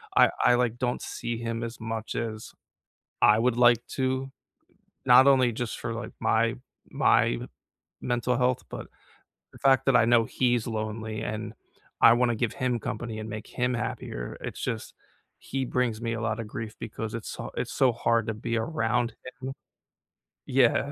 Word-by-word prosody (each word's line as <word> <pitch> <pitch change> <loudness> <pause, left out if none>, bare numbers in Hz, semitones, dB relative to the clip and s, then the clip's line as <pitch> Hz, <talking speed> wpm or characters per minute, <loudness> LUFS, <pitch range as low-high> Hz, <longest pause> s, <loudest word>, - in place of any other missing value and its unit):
I - - +7 0.2
I, 125 - +6
like, 120 -1 0
don't 125 -1 -1
see 120 -1 -4
him 115 0 -3
as 115 0 -5
much 115 0 -4
as 110 -2 -4 0.7
I 105 - +6
would 120 +1 +1
like 120 -1 +5
to, 130 0 -1 0.7
not 125 +2 +7
only 130 -3 +5
just 115 0 -4
for, 115 -1 -3
like, 115 -1 -6
my 115 +1 +2 0.3
my - - +3 0.7
mental 120 0 0
health, 125 0 +1
but - - -7 0.7
the - - -13
fact 135 -1 +4
that 135 - +4
I - - +4
know 120 0 +5
he's 120 -1 +1
lonely 110 -1 -3
and 110 0 -4 0.5
I 115 - +9
wanna 120 -1 +2
give 115 0 -1
him 125 -2 -1
company 110 +1 -4
and 110 0 -6
make 110 0 -6
him 125 0 -1
happier. - - -4
It's - - -6
just - - -3 0.5
he 135 0 -3
brings 120 -3 0
me 115 -1 -2
a 115 - -3
lot 110 0 -1
of 115 - -5
grief 110 0 -6
because 110 0 -5
it's 115 - -6
so - - -6
it's - - -3
so 130 - +4
hard 115 -1 +1
to 110 - -1
be 115 +2 -3
around 120 -2 0 0.3
him. 130 +1 -4 1.0
Yeah. 130 +2 +3
115 Hz, 170 wpm, -27 LUFS, 110-125 Hz, 1.0 s, I